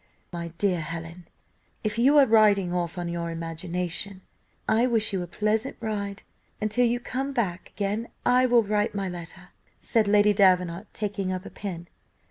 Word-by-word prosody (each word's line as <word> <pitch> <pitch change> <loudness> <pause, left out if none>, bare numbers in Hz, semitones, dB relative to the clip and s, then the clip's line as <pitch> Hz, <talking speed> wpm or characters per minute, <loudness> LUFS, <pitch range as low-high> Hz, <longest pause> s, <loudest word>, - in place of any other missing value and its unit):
"Now, 170 - -4
my 170 - -4
dear 185 -4 +1
Helen, 165 +2 -6 0.6
if 215 +1 -1
you 275 +5 +5
are 280 - +8
riding 210 -6 +4
off 175 0 -2
on 175 -1 -3
your 170 0 -3
imagination, 175 +3 -4 0.4
I 225 +3 +3
wish 225 -4 +1
you 190 - 0
a 175 - -5
pleasant 215 +7 -1
ride, 205 -3 -4 0.4
and 215 0 -1
till 245 +3 +3
you 240 +1 0
come 270 +2 -3
back 190 -8 -2
again 210 +3 -2 0.2
I 250 +1 +4
will 240 -2 +5
write 210 0 0
my 195 -1 -1
letter," 175 -2 -8 0.3
said 225 -3 +1
Lady 210 0 +5
Davenant, 185 -1 +3
taking 200 -3 -3
up 185 +1 -4
a - - -8
pen. 175 -4 -6
200 Hz, 175 wpm, -26 LUFS, 175-220 Hz, 0.6 s, are